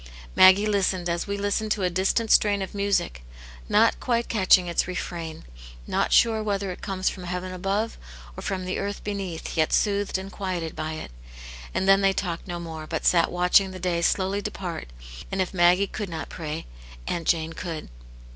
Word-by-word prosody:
Maggie 190 Hz, +2 st, +7 dB
listened 190 Hz, -4 st, +1 dB
as 170 Hz, 0 st, -2 dB
we 200 Hz, 0 st, -2 dB
listen 205 Hz, +2 st, -1 dB
to 210 Hz, -2 st, 0 dB
a 180 Hz, -, +2 dB
distant 195 Hz, +5 st, +1 dB
strain 205 Hz, -2 st, +4 dB
of 190 Hz, -, -7 dB
music, 200 Hz, -, -1 dB, 0.5 s
not -, -, +4 dB
quite 235 Hz, -1 st, 0 dB
catching 185 Hz, -4 st, +4 dB
its 170 Hz, -1 st, 0 dB
refrain, 170 Hz, -3 st, -5 dB, 0.4 s
not -, -, 0 dB
sure 225 Hz, -2 st, +4 dB
whether 200 Hz, -2 st, -1 dB
it 180 Hz, -, -9 dB
comes 190 Hz, -1 st, -2 dB
from 185 Hz, -, -2 dB
heaven 180 Hz, +1 st, -4 dB
above 200 Hz, +5 st, -2 dB, 0.4 s
or -, -, -7 dB
from 185 Hz, -1 st, -3 dB
the 185 Hz, -, -2 dB
earth 200 Hz, 0 st, -4 dB
be 205 Hz, -, -2 dB
neath, 185 Hz, -5 st, -5 dB
yet 160 Hz, -2 st, +2 dB
soothed 200 Hz, -2 st, +1 dB
and 190 Hz, +1 st, -7 dB
quieted 180 Hz, -5 st, -4 dB
by 155 Hz, 0 st, -3 dB
it. 155 Hz, -, -7 dB, 0.6 s
And 190 Hz, -, -1 dB
then 195 Hz, 0 st, +6 dB
they 195 Hz, -1 st, +3 dB
talked 175 Hz, -2 st, -3 dB
no 175 Hz, -1 st, -4 dB
more, 160 Hz, -2 st, -7 dB
but 160 Hz, -1 st, -3 dB
sat 170 Hz, -2 st, +4 dB
watching 180 Hz, +2 st, +4 dB
the 185 Hz, 0 st, -8 dB
day 175 Hz, -1 st, 0 dB
slowly 190 Hz, +3 st, +1 dB
depart, 180 Hz, -, -5 dB, 0.4 s
and 195 Hz, -, -2 dB
if 185 Hz, 0 st, -1 dB
Maggie 180 Hz, +2 st, +4 dB
could 205 Hz, 0 st, -5 dB
not 160 Hz, -2 st, -5 dB
pray, 155 Hz, -1 st, -5 dB, 0.4 s
Aunt 170 Hz, -2 st, -3 dB
Jane 165 Hz, -1 st, +1 dB
could. 165 Hz, -3 st, -6 dB
185 Hz, 190 wpm, -25 LUFS, 170-200 Hz, 0.6 s, Maggie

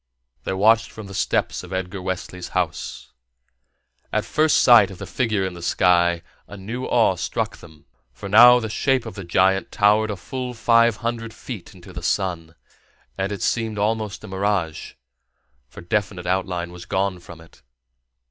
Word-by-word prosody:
They -, -, -2 dB
watched 110 Hz, +4 st, +3 dB
from 110 Hz, -, -10 dB
the 100 Hz, -, -10 dB
steps -, -, -1 dB
of 90 Hz, -, -12 dB
Edgar 95 Hz, +1 st, -4 dB
Wesley's 90 Hz, -1 st, -5 dB
house. 85 Hz, -4 st, -3 dB, 1.0 s
At 110 Hz, 0 st, 0 dB
first 155 Hz, +5 st, +2 dB
sight 120 Hz, -5 st, +7 dB
of 95 Hz, -, -10 dB
the 100 Hz, -, -7 dB
figure 105 Hz, -2 st, -1 dB
in 95 Hz, -, -4 dB
the 85 Hz, -, -10 dB
sky, 85 Hz, -1 st, +2 dB, 0.2 s
a 105 Hz, -, -10 dB
new 110 Hz, +7 st, -5 dB
awe -, -, +3 dB
struck -, -, -3 dB
them, 80 Hz, -3 st, -16 dB, 0.3 s
for 80 Hz, +11 st, -9 dB
now 120 Hz, +4 st, +8 dB
the 110 Hz, -, -4 dB
shape 130 Hz, +3 st, 0 dB
of 115 Hz, -, -7 dB
the 100 Hz, -, -8 dB
giant 95 Hz, +2 st, +1 dB
towered 105 Hz, +1 st, +3 dB
a 105 Hz, -, -2 dB
full 125 Hz, +5 st, -6 dB
five 115 Hz, 0 st, +4 dB
hundred 115 Hz, -1 st, -3 dB
feet -, -, -9 dB
into -, -, -14 dB
the -, -, -7 dB
sun, 85 Hz, -4 st, -2 dB, 0.6 s
and 95 Hz, +1 st, -2 dB
it 100 Hz, -3 st, -4 dB
seemed 110 Hz, -2 st, -1 dB
almost 105 Hz, -1 st, -2 dB
a -, -, -8 dB
mirage, 95 Hz, -4 st, -2 dB, 0.7 s
for -, -, -12 dB
definite 95 Hz, 0 st, -2 dB
outline 90 Hz, -1 st, -2 dB
was 90 Hz, 0 st, -10 dB
gone 95 Hz, -1 st, -1 dB
from 85 Hz, -1 st, -13 dB
it. 80 Hz, 0 st, -18 dB
100 Hz, 170 wpm, -22 LUFS, 90-110 Hz, 1.0 s, now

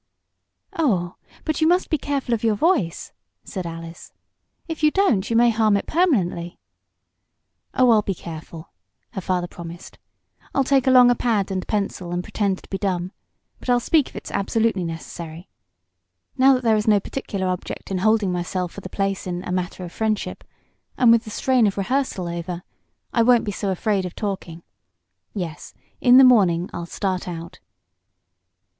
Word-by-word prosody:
"Oh, 185 Hz, -, 0 dB, 0.3 s
but 310 Hz, 0 st, -1 dB
you 315 Hz, -, +5 dB
must 355 Hz, +2 st, +2 dB
be 310 Hz, -, +1 dB
careful 275 Hz, -4 st, -2 dB
of 230 Hz, -, -1 dB
your 220 Hz, -2 st, +3 dB
voice," 210 Hz, -, 0 dB, 0.3 s
said 185 Hz, -3 st, -5 dB
Alice. 165 Hz, 0 st, -9 dB, 0.6 s
"If 325 Hz, -2 st, -5 dB
you 305 Hz, -, +5 dB
don't 300 Hz, -, +2 dB
you 230 Hz, -, 0 dB
may 235 Hz, 0 st, +5 dB
harm 215 Hz, -2 st, +3 dB
it -, -, -4 dB
permanently." 190 Hz, -, 0 dB, 1.2 s
"Oh 255 Hz, -2 st, +5 dB
I'll 220 Hz, -2 st, +5 dB
be 195 Hz, -2 st, -3 dB
careful," 165 Hz, +1 st, -9 dB, 0.4 s
her 190 Hz, -, -5 dB
father 180 Hz, -1 st, -1 dB
promised. 170 Hz, -1 st, -10 dB, 0.6 s
"I'll 275 Hz, -, +3 dB
take 270 Hz, 0 st, +2 dB
along 250 Hz, -1 st, +7 dB
a -, -, +3 dB
pad 210 Hz, -5 st, 0 dB
and 185 Hz, -1 st, -3 dB
pencil, 195 Hz, -4 st, -2 dB
and 175 Hz, 0 st, -2 dB
pretend 195 Hz, -2 st, -2 dB
to -, -, -17 dB
be 195 Hz, -, -2 dB
dumb. 185 Hz, -2 st, -1 dB, 0.5 s
But -, -, -8 dB
I'll 245 Hz, 0 st, +4 dB
speak 295 Hz, +3 st, +2 dB
if -, -, -22 dB
it's -, -, -7 dB
absolutely 220 Hz, -1 st, 0 dB
necessary. 165 Hz, +1 st, -7 dB, 0.9 s
Now 270 Hz, 0 st, +6 dB
that 255 Hz, -, -3 dB
there 225 Hz, -2 st, +4 dB
is 210 Hz, -, -2 dB
no 210 Hz, -2 st, +5 dB
particular 200 Hz, -3 st, -4 dB
object 185 Hz, +1 st, -4 dB
in 190 Hz, -, 0 dB
holding 215 Hz, -1 st, +2 dB
myself 180 Hz, 0 st, -2 dB
for 200 Hz, -, -9 dB
the 185 Hz, -, -8 dB
place 195 Hz, -1 st, -2 dB
in 180 Hz, 0 st, -4 dB
'A -, -, -5 dB
Matter 180 Hz, 0 st, -3 dB
of 175 Hz, -, -7 dB
Friendship,' 215 Hz, 0 st, -2 dB, 0.5 s
and 245 Hz, -2 st, +6 dB
with 230 Hz, 0 st, +4 dB
the -, -, -7 dB
strain 245 Hz, +1 st, +2 dB
of 200 Hz, -, -2 dB
rehearsal 200 Hz, -3 st, -1 dB
over, 170 Hz, +1 st, -5 dB, 0.5 s
I 235 Hz, -, +3 dB
won't 240 Hz, 0 st, +4 dB
be 205 Hz, -, -2 dB
so 200 Hz, 0 st, -3 dB
afraid 190 Hz, 0 st, 0 dB
of 180 Hz, -, -11 dB
talking. 185 Hz, -5 st, -5 dB, 0.7 s
Yes, 170 Hz, -6 st, -6 dB, 0.2 s
in 245 Hz, 0 st, +6 dB
the 265 Hz, -, +9 dB
morning 190 Hz, -9 st, +4 dB
I'll 170 Hz, -, -5 dB
start 185 Hz, 0 st, -2 dB
out." 170 Hz, -1 st, -7 dB
200 Hz, 175 wpm, -22 LUFS, 180-240 Hz, 1.2 s, the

